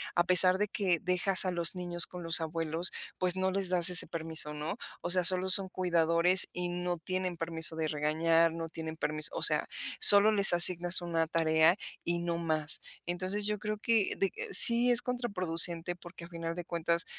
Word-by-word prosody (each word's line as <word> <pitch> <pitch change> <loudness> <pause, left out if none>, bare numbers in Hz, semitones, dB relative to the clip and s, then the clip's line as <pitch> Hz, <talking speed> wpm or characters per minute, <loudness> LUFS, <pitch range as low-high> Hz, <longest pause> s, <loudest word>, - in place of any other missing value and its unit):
a 175 0 -1
pesar 185 0 +5
de 210 +1 -4
que 185 -5 -4
dejas 180 +1 +4
a 185 - -4
los 170 +1 -2
niños 175 -1 -5
con 180 -1 -13
los 165 0 -2
abuelos, 165 +1 -5 0.3
pues, 185 0 -1
no 190 0 -4
les 195 -1 -4
das 180 -1 +2
ese 180 - +4
permiso, 160 -2 0
¿no? 155 +8 -8 0.2
O - - -8
sea, 180 -1 +1
solo 185 +1 -1
son 190 0 +4
cuidadores 175 0 0
y 180 0 -7
no 175 0 -7
tienen 185 0 -8
permiso 165 -1 -7
de 160 - -5
regañar, 160 +2 -2
no 165 0 -9
tienen 160 -1 -11
permis 155 -1 -3
o - - -8
sea, - - -1 0.3
solo 205 +1 +7
les 200 -4 +6
asignas 175 +1 +5
una 165 -1 -5
tarea 160 +1 -1 0.3
y 170 0 -4
no 170 -1 -6
más. 155 -2 -4 0.3
Entonces, 185 +4 -7
yo 210 -1 -6
creo 215 0 -7
que 225 -2 -3
de 195 - -2
eh, - - -9
sí 235 +5 +9
es 240 - +2
contraproducente, 180 -8 -3
porque, 175 -1 -16
a - - -18
final 165 -1 -9
de 175 -1 -10
cuentas, 170 0 -4
175 Hz, 195 wpm, -27 LUFS, 165-185 Hz, 0.3 s, sí